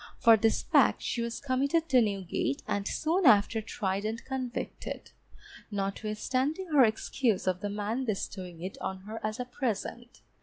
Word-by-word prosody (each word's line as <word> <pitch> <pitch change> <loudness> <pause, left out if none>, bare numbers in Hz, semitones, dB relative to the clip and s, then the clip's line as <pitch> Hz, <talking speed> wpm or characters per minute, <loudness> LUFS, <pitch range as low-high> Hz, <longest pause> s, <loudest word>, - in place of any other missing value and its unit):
For 230 -1 +7
this 220 +1 +2
fact - - +4
she 235 - -1
was 235 0 -3
committed 280 +5 +1
to 255 -3 +6
Newgate, 195 -9 -1
and 200 0 -1
soon 335 +2 +1
after 220 0 +5
tried 200 -2 -2
and 220 +2 -3
convicted, 255 -2 -5 0.6
notwithstanding 220 - -2
her 290 -4 +6
excuse 220 -1 +1
of 185 -1 +1
the 205 - -3
man 210 +5 -2
bestowing 185 -5 -4
it 190 - -6
on 190 0 -4
her 215 +3 -7
as 215 +3 -2
a 250 - -2
present. 240 -1 -4
225 Hz, 155 wpm, -30 LUFS, 200-255 Hz, 0.6 s, For